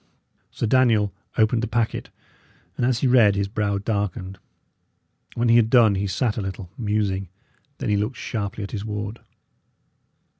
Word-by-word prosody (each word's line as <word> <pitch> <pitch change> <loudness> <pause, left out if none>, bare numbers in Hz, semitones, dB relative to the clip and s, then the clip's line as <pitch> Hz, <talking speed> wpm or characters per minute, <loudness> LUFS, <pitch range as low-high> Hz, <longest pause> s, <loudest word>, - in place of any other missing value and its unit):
Sir - - -3
Daniel 115 -4 +3 0.2
opened 110 +1 +3
the 120 - -1
packet, 115 0 -1 0.7
and 120 - 0
as 125 -2 0
he 135 - +3
read 115 -5 +5
his 100 -1 0
brow 100 -1 -1
darkened. 100 -2 -3 1.0
When 120 +1 +1
he 115 0 +6
had 115 -2 +4
done 115 -4 +6
he 100 +1 -1
sat 105 +5 -1
a - - -1
little, 95 -2 -6
musing. 105 -4 -1 0.5
Then - - -3
he 105 - +2
looked 105 +5 -2
sharply 105 -2 -4
at 100 - -6
his 100 -2 -4
ward. 105 +1 -5
105 Hz, 160 wpm, -23 LUFS, 100-115 Hz, 1.0 s, he